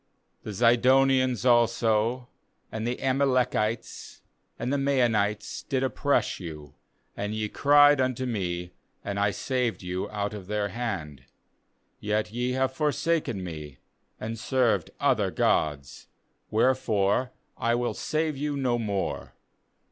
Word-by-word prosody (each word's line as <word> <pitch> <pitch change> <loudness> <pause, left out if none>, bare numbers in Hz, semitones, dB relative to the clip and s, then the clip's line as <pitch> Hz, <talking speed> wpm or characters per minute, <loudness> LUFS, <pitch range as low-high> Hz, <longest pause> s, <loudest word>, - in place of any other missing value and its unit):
12The 105 - -4
Zidonians 130 +2 +3
also, 120 0 +2 0.4
and 110 +1 -3
the 125 - -2
Amalek 130 -2 +1
ites, 110 +2 -3 0.3
and 125 +3 -2
the - - +2
Maonites, 120 -7 0
did 135 -1 0
oppress 140 +2 0
you; 75 -5 -9 0.4
and 105 +1 -3
ye 110 0 -1
cried 145 +3 +5
unto 130 0 -1
Me, 90 -7 -3 0.3
and 100 0 -3
I 100 0 +3
saved 125 0 -2
you 90 +1 -3
out 105 0 -3
of 100 -3 -8
their 105 0 -1
hand. 90 - -5 0.8
^Yet 105 0 -1
ye 125 +1 -1
have 130 0 0
forsaken 150 - 0
Me, 75 -5 -7 0.4
and 115 +1 -5
served 120 - +1
other - - +2
gods; 70 -3 -1 0.4
wherefore 110 -1 +2 0.3
I 115 0 +1
will 120 0 -1
save 155 0 -1
you 145 +1 -2
no 125 -3 0
more. 100 -4 -3
115 Hz, 125 wpm, -27 LUFS, 100-130 Hz, 0.8 s, cried